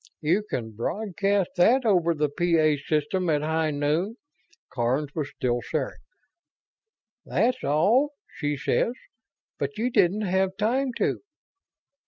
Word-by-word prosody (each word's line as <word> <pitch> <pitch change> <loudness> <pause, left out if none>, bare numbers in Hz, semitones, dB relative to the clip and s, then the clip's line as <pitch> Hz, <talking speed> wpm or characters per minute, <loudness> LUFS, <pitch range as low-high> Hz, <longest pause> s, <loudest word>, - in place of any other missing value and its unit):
"You 165 +7 +2
can 110 -2 -3
broadcast 195 - -1
that 240 +9 +4
over 175 -6 +3
the 150 0 +1
P 170 +3 +1
A 155 -1 +4
system 155 +5 -1
at 150 -1 +1
high 160 0 0
noon." 150 +8 0 0.6
Karns 130 +4 -1
was 150 -3 -3
still 120 -2 -1
staring. - - -3 1.2
"'That's 245 +3 0
all,' 210 - +3 0.2
she 145 -2 -2
says. 230 - +1 0.7
But 140 0 -3
you 240 +3 0
didn't 195 0 +3
have 190 -1 0
time 255 +5 +1
to - - 0
170 Hz, 130 wpm, -26 LUFS, 145-205 Hz, 1.2 s, that